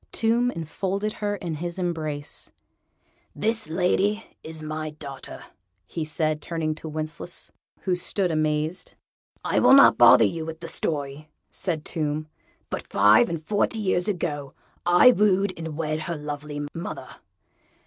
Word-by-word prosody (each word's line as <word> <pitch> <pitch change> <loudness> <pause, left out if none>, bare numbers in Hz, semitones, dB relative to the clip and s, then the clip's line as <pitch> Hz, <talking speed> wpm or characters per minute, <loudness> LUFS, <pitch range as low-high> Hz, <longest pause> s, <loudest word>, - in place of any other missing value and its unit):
Tomb 235 +2 +2
enfolded 195 +3 -3
her 205 0 0
in 175 -4 -5
his 170 +3 -4
embrace. 155 -5 -3 0.8
"This 225 -2 0
lady 190 +5 +1 0.2
is 160 -1 -6
my 155 0 -4
daughter," 140 -3 -9 0.4
he 160 - -4
said, 155 0 -1
turning 160 -1 -2
to 160 +1 -8
Wencheslaus, 155 +3 -5 0.3
who 185 - 0
stood 180 +1 0
amazed. 155 +2 -1 0.5
"I - - +2
will - - +6
not 275 0 +8
bother 120 -1 +8
you 160 +10 -2
with 160 0 -6
the 170 - -7
story," 150 -2 -3 0.2
said 165 -5 -2
Tomb, 155 -1 -2 0.4
"but - - -4
five 105 - +5
and 170 -1 -2
forty 210 +4 +1
years 185 -3 +1
ago 150 -8 -3 0.3
I 175 +8 +8
wooed 200 -3 +2
and 160 -2 -6
wed 155 -1 -1
her 170 +2 -3
lovely 145 0 -5
mother. 165 - -7
160 Hz, 140 wpm, -25 LUFS, 150-185 Hz, 0.8 s, not